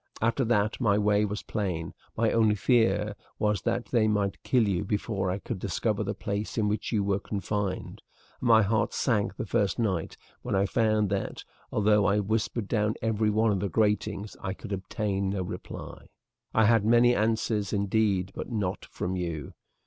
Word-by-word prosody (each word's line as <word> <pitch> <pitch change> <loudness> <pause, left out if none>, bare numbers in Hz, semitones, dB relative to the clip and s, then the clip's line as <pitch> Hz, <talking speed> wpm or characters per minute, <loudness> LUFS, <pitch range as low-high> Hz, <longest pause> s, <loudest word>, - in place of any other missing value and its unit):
After 115 +4 +1
that 110 +1 +1
my 105 -4 +3
way 105 0 +3
was 105 0 -4
plain; 90 -7 -3 0.2
my 115 0 +2
only 110 -2 +3
fear 105 -2 +2 0.2
was 105 -3 +1
that 120 - -1
they 115 -3 +3
might 100 -2 0
kill 120 -5 +2
you 95 -2 0
before 100 -2 -1
I 90 - -1
could 100 - -5
discover 105 +3 -1
the 100 0 -3
place 105 +1 -4
in 110 -2 +2
which 105 +1 -2
you 105 -4 +1
were 100 0 +1
confined, 100 -1 -3 0.4
and 125 - -2
my 110 -2 +7
heart 105 +1 0
sank 105 -6 +1
the - - -4
first 100 -2 0
night 95 -9 -1 0.2
when - - -2
I 95 +1 +3
found 110 -1 +1
that, 100 -1 -2 0.3
though 105 -1 +3
I 100 - +3
whispered 110 +1 -1
down 105 -1 +1
every 110 -1 +1
one 110 +1 +2
of 100 - 0
the 100 - -1
gratings, 105 +1 0
I 95 0 -3
could 100 - -7
obtain 100 0 -2
no 95 -1 -1
reply. 90 - -8 0.4
"I 110 - +4
had 115 -1 +4
many 120 +2 +5
answers, 110 -1 0
indeed, 100 -2 +1
but - - -6
not 100 -5 -2
from 90 +1 -4
you. 85 -5 -4
105 Hz, 180 wpm, -28 LUFS, 100-110 Hz, 0.4 s, my